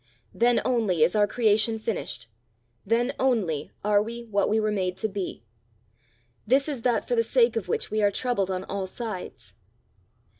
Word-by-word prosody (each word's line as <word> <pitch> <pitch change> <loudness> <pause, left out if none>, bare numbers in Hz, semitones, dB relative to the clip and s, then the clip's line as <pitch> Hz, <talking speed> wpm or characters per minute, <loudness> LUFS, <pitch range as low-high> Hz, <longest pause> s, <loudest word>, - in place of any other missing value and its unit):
Then 240 +1 +3
only 215 -10 +2
is 165 - +3
our 205 -1 +4
creation 220 0 +2
finished 220 -1 -4 0.6
then 235 +4 +1
only 195 - 0
are 205 0 +3
we 235 +2 -5
what 205 -3 0
we 220 - +2
were 215 0 0
made 185 -3 -1
to 205 - -1
be. 195 - -5 1.0
This 270 +5 +3
is 280 -6 -3
that 240 -1 +1
for - - -1
the 460 - +4
sake 470 +1 +3
of - - -2
which 460 -1 -2
we 215 0 0
are 205 - +4
troubled 200 -2 -1
on 185 0 -2
all 195 -1 -4
sides." 215 -2 -7
215 Hz, 175 wpm, -26 LUFS, 195-240 Hz, 1.0 s, our